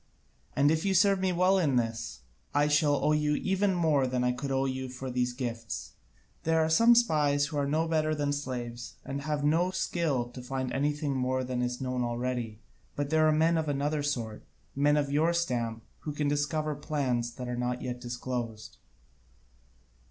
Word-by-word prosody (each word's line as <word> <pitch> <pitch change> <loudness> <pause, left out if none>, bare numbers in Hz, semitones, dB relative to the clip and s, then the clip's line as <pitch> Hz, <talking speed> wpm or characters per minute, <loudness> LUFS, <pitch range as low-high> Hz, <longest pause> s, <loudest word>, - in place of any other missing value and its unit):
And 145 +2 +4
if 160 0 +1
you 195 -1 +1
serve 195 +1 +4
me 190 0 +1
well 185 +2 +3
in 145 -7 +2
this, 115 - -2 0.3
I 145 +1 +4
shall 150 0 +3
owe 150 - +1
you 150 -1 +2
even 190 +3 +1
more 155 -6 +2
than 125 0 0
I 125 - +3
could 130 +3 -4
owe 135 0 +1
you 130 -1 -3
for 130 +1 -6
these 125 0 0
gifts. 115 - -5 0.5
There 160 0 +2
are 160 0 +2
some 230 +8 +6
spies 150 -11 +3
who 145 +1 -5
are 140 -1 +1
no 155 +3 +1
better 155 -1 +1
than 145 -1 0
slaves, 120 -4 -5
and 140 +1 -4
have 150 0 -2
no 165 +5 +3
skill 170 -8 0
to 125 +1 -9
find 130 0 -3
out - - -3
anything 145 0 0
more 130 0 0
than 125 -1 -2
is 125 0 -2
known 125 -1 -1
already, 120 -2 -3 0.4
but 145 0 -2
there 155 0 +4
are - - +5
men 160 +2 +3
of 155 -2 -2
another 145 +2 0
sort, 120 -7 -3 0.3
men 145 +2 +3
of 140 -1 0
your 160 +4 +3
stamp, 120 -9 -1 0.2
who 150 - -5
can 150 0 -1
discover 150 +1 0
plans 130 -6 -1
that 125 - -6
are 125 - -2
not 125 0 -2
yet 125 -1 -4
disclosed." 120 -2 -5
140 Hz, 195 wpm, -29 LUFS, 125-155 Hz, 0.5 s, some